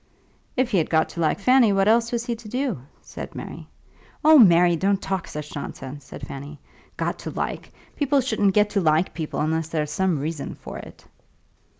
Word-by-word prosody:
"If 255 -1 +1
he 195 - +3
had 160 - -1
got 160 -1 +2
to - - -8
like 160 +2 +1
Fanny 250 0 +5
what 195 0 +2
else 230 +1 +3
was 235 -1 -2
he 240 -1 -2
to 220 -2 -11
do?" 250 - -2 0.2
said - - -9
Mary. - - -8 0.6
"Oh, 310 -1 +8
Mary, 175 -5 +6
don't 195 +3 +1
talk 190 -2 -3
such 150 0 -7
nonsense," 140 -1 -7
said 140 - -9
Fanny. 140 +2 -8 0.4
"Got - - -2
to - - -6
like! - - -4 0.2
People 285 -1 +2
shouldn't 220 -6 +1
get 210 0 +3
to 200 - +1
like 160 +1 +2
people 160 -2 -3
unless 160 +1 0
there's 155 -2 -2
some 190 -1 +1
reason 150 +1 -4
for - - -9
it." - - -13
185 Hz, 195 wpm, -24 LUFS, 155-230 Hz, 0.6 s, Oh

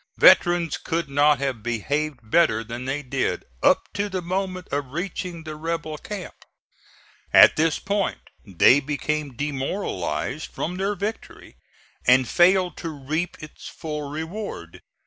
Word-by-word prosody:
Veterans 175 -3 +5
could 165 -2 -3
not 145 +1 +4
have 135 -4 -2
behaved 140 +6 -2
better 115 -1 +3
than 120 +3 -6
they 140 +2 -2
did 130 0 -2 0.2
up - - +3
to 205 0 -1
the 185 -2 -3
moment 185 0 -3
of 140 -2 -3
reaching 175 -1 -4
the 155 -1 -7
rebel 160 -1 -4
camp. 200 -4 -7 1.0
At - - +8
this 160 0 +2
point 200 0 -1 0.2
they 100 +6 +5
became 145 -1 -3
demoralized 135 - -3
from 180 +3 -4
their 200 +2 -1
victory 205 +4 -6 0.5
and 125 0 +5
failed 180 +1 +3
to 165 - -4
reap 155 +4 -3
its 155 - -10
full 150 -2 -5
reward. 160 - -6
155 Hz, 135 wpm, -24 LUFS, 135-175 Hz, 1.0 s, At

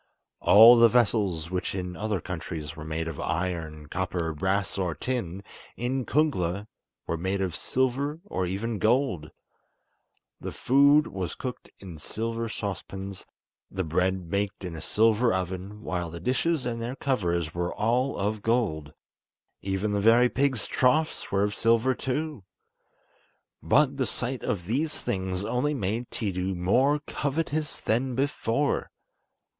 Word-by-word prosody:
All 115 +4 +9
the 115 0 +7
vessels 100 -8 +1
which 90 +1 -2
in 90 -1 -4
other 105 -1 -1
countries 80 -3 -6
are 80 - -8
made 80 +1 -3
of 80 -3 -5
iron, 80 -3 -3
copper, 85 0 -2
brass, 95 +5 0
or 90 -4 -1
tin, 100 - -3 0.3
in 125 +1 -2
Kungla 100 - +1 0.4
were 85 - -2
made 95 +4 -1
of 95 -4 -1
silver, 130 - -1
or 95 - -2
even 100 +6 -2
of 105 - -4
gold. 110 - +1 1.1
The - - -5
food 140 +3 +5
was 95 -4 -4
cooked 125 -2 -6
in 90 -5 -9
silver 115 +7 -3
saucepans, 95 -1 -6 0.4
the 95 0 -2
bread 90 +1 0
baked 100 0 -1
in 90 -3 -5
a 80 - -7
silver 115 +2 +3
oven, 95 +3 -4
while 90 -2 -2
the 85 +1 -7
dishes 135 - 0
and 115 -1 -2
their 120 +3 -3
covers 85 - -1
were 85 0 -2
all 125 +5 0
of 105 +1 -1
gold. 100 -11 0 0.7
Even 95 +2 -1
the 100 - +1
very 115 +3 +6
pigs' 130 -4 +1
troughs 155 +5 +1
were 100 0 +2
of 105 0 0
silver 115 +4 +3
too. 145 -2 -3 1.2
But 140 -2 +3
the 130 - 0
sight 125 0 -3
of 90 -4 -2
these 145 - -1
things 95 0 -2
only 125 +7 0
made 115 +1 -2
Tiidu 95 -3 -2
more 130 +12 +2
covetous 150 +1 -2
than 125 +3 0
before. 140 0 0
105 Hz, 145 wpm, -27 LUFS, 90-125 Hz, 1.2 s, All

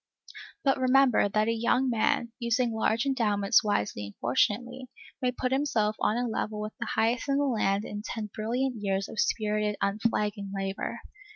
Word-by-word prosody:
But 270 -1 +2
remember, 260 -4 +4
that 215 +2 +1
a 230 - +2
young 235 +3 +1
man, 235 0 +1
using 235 0 +1
large 220 +2 +1
endowments 210 -7 +2
wisely 105 - -1
and 100 - -12
fortunately, 240 - 0 0.3
may 250 -1 +1
put 255 +1 -2
himself 230 -6 +1
on 215 - +1
a 245 0 0
level 215 -1 -3
with 215 0 -5
the - - -3
highest 230 +5 +1
in 275 - +2
the 285 - +2
land 210 -5 +1
in 205 - -5
ten 215 -1 -5
brilliant 240 +2 -2
years 195 -1 -1
of 215 - -7
spirited, 210 -1 0
unflagging 205 -1 -1
labor. 195 0 -3
220 Hz, 170 wpm, -28 LUFS, 210-250 Hz, 0.3 s, remember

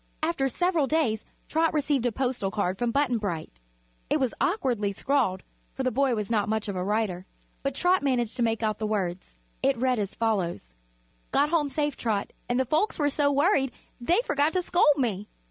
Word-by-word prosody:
After 310 -5 +1
several 345 -1 +1
days 250 -9 +1 0.2
Trot 320 0 +1
received 280 -4 +1
a - - 0
postal 245 -4 -1
card 190 -2 -1
from 240 - +1
Button 250 -2 +1
Bright. 165 - -4 0.5
It - - +2
was 260 -3 0
awkwardly 245 - +1
scrawled, 215 -4 0 0.3
for 265 - -2
the 255 - +1
boy 265 0 +2
was 210 -2 -2
not 210 -2 +1
much 220 0 -1
of 200 - -3
a 180 - -1
writer, 200 -2 -1 0.3
but 275 -1 -2
Trot 360 +4 +3
managed 245 -5 0
to - - -2
make 225 -1 +1
out 215 -1 0
the 215 - -1
words. 190 -4 -3 0.3
It 270 -1 +2
read 250 -1 +1
as 200 -2 -3
follows: 190 - -1 0.6
"Got 290 +1 +2
home 305 -3 +1
safe, 295 -1 -1
Trot, 215 -4 -2 0.2
and 245 +1 +1
the 260 - +2
folks 310 - +1
were 290 -3 +1
so 285 0 +2
worried 280 -2 +2 0.3
they 340 - +3
forgot 290 +2 +1
to 365 -1 +1
scold 350 -2 +3
me. 210 -6 -1
250 Hz, 195 wpm, -27 LUFS, 210-285 Hz, 0.6 s, Trot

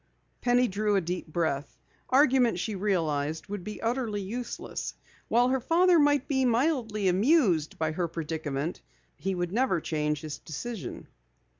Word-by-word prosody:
Penny 245 0 +3
drew 210 +1 0
a - - +4
deep 175 +1 -4
breath. 155 -3 -2 0.3
Argument, 255 - +4
she 215 +4 -2
realized, 160 -6 -1
would 205 -3 -4
be 210 +3 -6
utterly 230 -3 -1
useless. 230 +5 -5 0.3
While 245 +2 +3
her 265 0 +2
father 345 +5 +4
might 290 -2 +3
be 265 -2 +1
mildly 235 -5 +1
amused 190 - +3
by 160 -1 0
her 170 +2 -1
predicament, 160 -2 -3 0.3
he 190 0 -2
never 185 +6 +1
would 165 - -3
change 150 -1 -1
his 150 -2 -6
decision. 220 +7 -6
200 Hz, 145 wpm, -28 LUFS, 160-245 Hz, 0.3 s, a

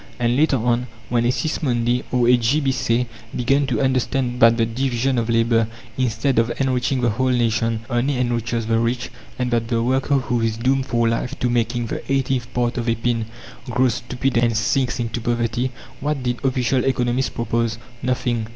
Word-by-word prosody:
And 120 0 +1
later 145 0 +3
on, 120 +1 0 0.2
when 120 -1 +1
a 120 - +3
Sismondi 125 -4 0
or 125 -1 +2
a 125 - +7
J. 120 +5 +2
B. 135 -3 +1
Say 125 -2 +1 0.3
began 135 +3 +2
to 125 -5 0
understand 130 -1 0
that 115 -1 +6
the 115 - +3
division 125 +2 0
of 115 0 -2
labour, 115 -1 +3 0.3
instead 125 0 +1
of 115 +1 +1
enriching 130 -1 +1
the 120 -2 +2
whole 130 +4 0
nation, 115 -2 +1
only 130 +2 0
enriches 120 -2 -1
the 115 0 +1
rich, 120 +2 -1 0.3
and 125 -1 -1
that 115 -1 +1
the 115 -1 0
worker, 130 +3 +1
who 125 -3 0
is 110 -1 0
doomed 130 +3 +1
for 120 -1 +1
life 125 +4 -1
to 125 - +1
making 120 0 0
the - - -4
eighteenth 130 -2 0
part 120 0 0
of 120 0 -1
a 115 - +2
pin, 115 -1 -1 0.4
grows 125 0 +2
stupid 125 +2 -2
and 115 -1 +2
sinks 125 +2 0
into 120 0 -3
poverty 120 +2 0 0.3
what 145 -2 -2
did 125 -1 -2
official 130 -1 +1
economists 125 0 +1
propose? 115 0 -1 0.2
Nothing! 120 -3 -1
120 Hz, 190 wpm, -21 LUFS, 115-130 Hz, 0.4 s, a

